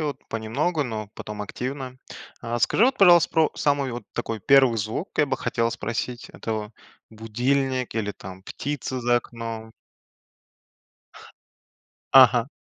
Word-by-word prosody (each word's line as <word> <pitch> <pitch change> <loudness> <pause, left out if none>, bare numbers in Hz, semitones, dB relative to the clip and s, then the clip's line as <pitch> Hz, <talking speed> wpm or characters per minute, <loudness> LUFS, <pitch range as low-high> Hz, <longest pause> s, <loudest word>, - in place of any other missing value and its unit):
вот. 150 -2 -2
Понемногу, 135 +9 -1
но 110 -3 -5
потом 105 -1 -6
активно. 130 +4 -6 0.4
А 120 0 -3
скажи 210 - +3
вот, 265 +1 +2
пожалуйста, 175 -4 +7
про 160 -2 +3
самый 140 -3 0
вот 120 -2 -6
такой 115 -1 -4
1 135 +1 +5
звук, 110 - -3
я 150 - +4
бы - - -1
хотел 115 -1 -1
спросить. 120 +3 -4
Это 110 -1 -4 0.4
будильник 125 +4 -1
или 105 -2 -2
там 95 -1 -11
птица 130 +3 -4
за 120 0 +3
окном? 115 -2 -6 2.4
Ага. 125 -2 +7
120 Hz, 130 wpm, -24 LUFS, 110-140 Hz, 2.4 s, пожалуйста